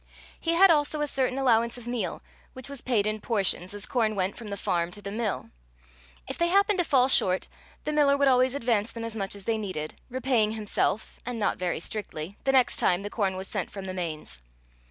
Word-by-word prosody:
He 330 - 0
had 375 +2 +7
also 300 -1 +2
a - - +2
certain 265 -2 0
allowance 235 -3 +3
of 245 - -9
meal, 235 -7 -3 0.3
which 260 -1 -4
was 280 -3 -4
paid 230 -5 +1
in 215 0 -1
portions, 195 -5 -1
as 205 - -3
corn 220 -4 0
went 190 0 -1
from 230 - -9
the 200 -1 -5
farm 170 -2 0
to 205 - -8
the 200 - -5
mill. 220 -1 -3 0.8
If - - -6
they 340 - +3
happened 400 +2 +3
to - - +4
fall 260 -6 +4
short, 185 -8 +3 0.4
the 300 - -2
miller 290 -2 +4
would 280 0 +3
always 255 0 +4
advance 230 -4 0
them 230 -1 -6
as 230 -1 -4
much 195 -2 -2
as 200 - -8
they 220 +2 0
needed, 170 -7 -5
repaying 250 -4 +1
himself 215 0 -1
and 245 -1 -4
not 215 - 0
very 180 -1 -1
strictly 180 -2 -5
the 270 - +4
next 260 -2 +3
time 180 +2 +2
the 205 - -5
corn 195 -4 0
was 190 +1 -5
sent - - -3
from 195 -1 -7
the 185 - -4
Mains. 155 - -5
225 Hz, 220 wpm, -27 LUFS, 195-260 Hz, 0.8 s, had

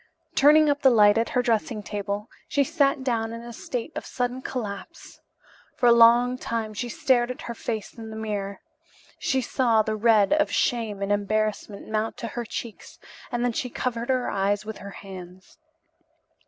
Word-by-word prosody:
Turning 300 +2 +6
up 290 0 +1
the 265 - +7
light 210 -4 +6
at 230 +1 +1
her 250 0 +1
dressing 230 -1 0
table, 205 +1 -4 0.2
she 285 - +2
sat 280 -3 +1
down 225 -3 -1
in 230 0 -7
a 235 0 -8
state 245 +4 -5
of - - -4
sudden 245 0 -3
collapse. 210 -7 -7 0.6
For - - 0
a 240 - +8
long 240 +2 +6
time 225 -3 -3
she 240 +3 -4
stared 240 0 +2
at 250 - -6
her 235 - -5
face 220 -2 -5
in 225 -1 -9
the 220 - -8
mirror. 205 -3 -4 0.6
She 265 -3 +1
saw 230 -3 +2
the 215 0 -2
red 215 +1 +4
of 305 0 +2
shame 225 -6 0
and 200 - -1
embarrassment 205 0 -1
mount 215 +1 -2
to 230 - -5
her 240 +2 -5
cheeks 225 0 -7 0.3
and 240 0 0
then 245 - 0
she 250 0 -2
covered 235 0 -3
her 255 -1 +1
eyes 200 +1 0
with 220 0 -7
her 200 - -8 0.2
hands. 185 -1 -11
230 Hz, 180 wpm, -25 LUFS, 210-250 Hz, 0.6 s, a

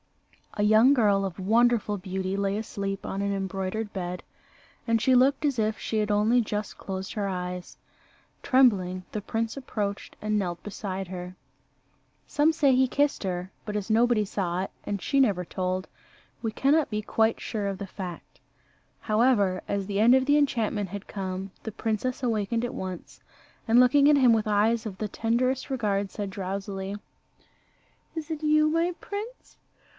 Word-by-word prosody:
A 205 - 0
young 220 +6 +6
girl 205 -6 +3
of 190 -1 -4
wonderful 220 +1 +2
beauty 190 0 -3
lay 200 0 0
asleep 200 -3 -4
on 195 - -3
an 200 0 0
embroidered 195 +2 -3
bed, 180 -2 -4 0.7
and 230 0 +3
she 260 +3 +3
looked 270 +4 +4
as 280 -4 +1
if 215 0 0
she 220 - -1
had 210 0 0
only 215 +4 +3
just 210 -1 -4
closed 190 -1 -5
her 205 -3 -2
eyes. 180 -1 -5 0.6
Trembling, 190 -9 +3
the 210 - -3
prince 225 +2 -2
approached 210 -7 -4
and 215 0 0
knelt 175 -3 -3
beside 195 -2 -5
her. 180 0 -7 0.9
Some 300 +2 +3
say 285 -5 +3
he 260 +1 +4
kissed 285 0 +1
her, 180 0 -3
but 210 -1 -5
as 205 +1 -4
nobody 225 -1 +3
saw 185 -2 -2
it, - - -6
and 200 -1 -2
she 275 - +1
never 195 -8 +2
told, 185 +1 -2 0.5
we 225 - -2
cannot 285 +6 +2
be 210 -1 -2
quite 220 +1 +1
sure 210 -2 -3
of 195 -1 -3
the 200 - -6
fact. 185 -3 -8 0.6
However, 215 -4 +2
as 200 -1 -1
the 200 +1 -1
end 240 +3 +7
of 260 0 +3
the 290 +1 +4
enchantment 225 -8 0
had 200 +1 -7
come, 190 -1 -5
the 220 - -4
princess 225 +5 -2
awakened 230 0 0
at 245 - -5
once, 185 -2 -7 0.5
and 230 +2 +5
looking 280 +3 +6
at 295 - +6
him 255 -4 +6
with 220 -1 +1
eyes 215 +2 +2
of 190 -3 -7
the 215 - -2
tenderest 240 +5 0
regard, 205 -6 0
said 200 0 -5
drowsily, 195 +1 -4 1.2
"Is 320 0 -5
it 315 -1 -4
you, 305 0 +4
my 330 +3 +1
prince? 430 +5 -7
210 Hz, 170 wpm, -27 LUFS, 195-245 Hz, 1.2 s, end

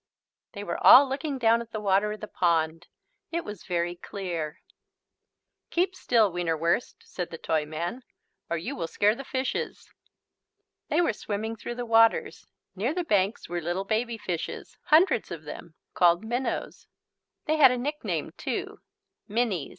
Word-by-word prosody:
They 205 -2 -6
were 170 -4 -4
all 275 +2 +10
looking 275 +1 -3
down 230 -1 +3
at 235 - -9
the 215 - -3
water 200 +1 +2
of 215 - -7
the 215 - -5
pond. 165 -2 0 0.4
It 340 0 -2
was 210 -3 -8
very 175 -1 -1
clear. 175 -4 -5 1.1
"Keep 370 +2 0
still, 225 - +3
Wienerwurst," 170 +3 0
said 180 -2 -5
the 165 - -7
Toyman, 160 +9 -2 0.5
"or 170 - 0
you 165 - -4
will 165 - -3
scare 205 +5 +2
the 270 +4 -7
fishes." 260 0 -3 0.9
They 315 +4 +2
were 330 - +2
swimming 215 +2 -4
through 240 +2 -6
the 245 0 -4
waters. 225 0 +3 0.3
Near 235 - -1
the 360 - 0
banks 205 - +1
were 175 0 -3
little 175 +4 -2
baby 225 +2 -1
fishes, 175 -6 -5
hundreds 315 - +4
of 165 -2 -7
them, 160 +2 -9 0.2
called 175 +3 +4
minnows. 245 +4 -3 0.6
They 310 0 +1
had 275 -4 +8
a 250 - 0
nickname 295 +5 -3
too, - - -4 0.5
"minnies." 210 - -1
210 Hz, 155 wpm, -27 LUFS, 175-245 Hz, 1.1 s, all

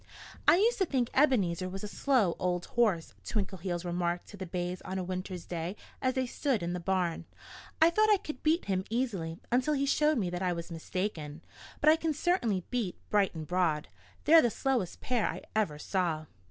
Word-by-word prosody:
"I - - +8
used 450 +4 +3
to 380 - +3
think 250 -5 0
Ebenezer 190 - +2
was 195 +2 -6
a - - -3
slow 220 -5 +2
old 180 -1 0
horse," 210 -9 +2
Twinkleheels 185 -4 -3
remarked 175 0 -1
to - - -10
the 190 -1 -6
bays 180 +1 -3
on 190 - -5
a 185 - -1
winter's 185 0 -5
day 175 +2 -4 0.3
as 255 0 +1
they 260 -1 +1
stood 250 - -1
in 175 +1 -2
the 180 - -2
barn. 180 -1 -1 0.5
"I 325 +1 +6
thought 430 +4 +3
I 420 - +6
could 305 -8 -7
beat 320 +3 +2
him 190 -1 0
easily 205 -9 -2
until 260 +5 +2
he 280 0 +1
showed 300 +1 +3
me 185 -6 -1
that 180 0 -3
I 180 -1 +1
was 170 0 -6
mistaken. 165 -2 -4 0.4
But 305 - +7
I 320 - +4
can 320 -2 -1
certainly 240 - +1
beat 235 -8 -1
Bright 200 -4 +2
and 160 -1 -5
Broad. 165 -3 0 0.4
They're 325 +2 +8
the 240 - +3
slowest 240 -6 -1
pair 245 -3 +1
I - - -4
ever 200 -9 +1
saw." 165 -2 -1
190 Hz, 200 wpm, -30 LUFS, 175-260 Hz, 0.5 s, I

